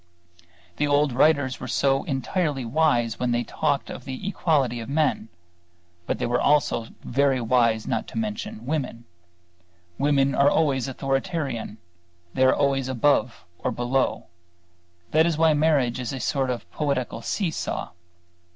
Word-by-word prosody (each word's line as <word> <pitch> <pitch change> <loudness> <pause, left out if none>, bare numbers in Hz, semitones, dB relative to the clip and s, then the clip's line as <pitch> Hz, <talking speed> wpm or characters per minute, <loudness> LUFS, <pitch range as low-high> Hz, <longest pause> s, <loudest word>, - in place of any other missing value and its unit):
The 150 - +1
old 145 -1 +2
writers 140 -1 +2
were - - -6 0.4
entirely 140 0 -1
wise 120 -4 +1
when 125 - 0
they 120 0 +1
talked - - -1
of - - -8
the 130 +7 -6
equality 145 -11 +1
of 115 - -7
men; 145 -6 0 0.8
but - - -1
they - - -2
were 120 +1 0
also 140 -6 +2 0.2
very 135 +1 +1
wise 115 -2 +2
in - - -4
not - - -3
mentioning 110 0 -4
women. 130 -5 -3 0.9
Women 140 -1 +2
are 140 +1 +4
always 140 -5 +1
authoritarian; 135 - -2 0.6
they 130 - +3
are 130 - +5
always 135 -2 +1
above 120 - +1
or - - -1
below; 125 +2 -1 0.9
that 160 +2 +4
is 165 -3 0
why 160 -1 +4
marriage 145 -5 +2
is 125 -2 -3
a 135 - -4
sort 135 +1 0
of 125 -2 -4
poetical 130 -6 -2
see 180 - -1
saw. - - -4
135 Hz, 145 wpm, -24 LUFS, 120-150 Hz, 0.9 s, are